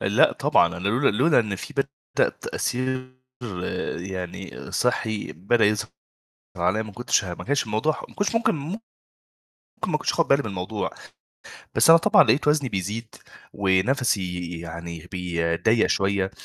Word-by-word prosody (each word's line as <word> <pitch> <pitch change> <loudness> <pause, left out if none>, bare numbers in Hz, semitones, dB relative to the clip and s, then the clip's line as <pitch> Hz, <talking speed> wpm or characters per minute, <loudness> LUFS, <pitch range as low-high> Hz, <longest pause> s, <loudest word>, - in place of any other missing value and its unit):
لأ، - - +4
طبعًا - - +3
أنا 90 +2 -5
لولا 130 +6 +3
لولا 145 +9 +4
إن 105 -3 -3
في - - -8
بدأ 140 0 -1
تأثير 130 +1 -3 0.8
يعني 90 -9 -6
صحّي 110 -3 -1
بدأ 105 +7 +1
يظهر 105 0 +1 0.7
عليّا 90 +5 +1
ما 110 -2 -9
كنتش 120 -1 +1
ه 90 -2 -4
ما - - -9
كانش 145 +2 +1
الموضوع 110 +8 0
ح - - -8
ما - - -17
كنش 205 +2 -1
ممكن 225 - +2
ممكن 165 +9 -5 1.1
ما - - +1
كنتش - - 0
آخُد - - +1
بالي 140 +1 +4
من 110 - -4
الموضوع، 95 +3 -3 0.8
بس - - +6
أنا 165 - +9
طبعًا 165 - +6
لقيت 130 +5 +2
وزني 150 -3 +2
بيزيد 105 +3 -4 0.4
ونَفَسي 95 -3 +1
يعني 85 -1 -7
بي 85 -2 -1
ضيّق 110 +6 +3
شويّة 95 -1 +1
105 Hz, 155 wpm, -24 LUFS, 90-130 Hz, 1.1 s, أنا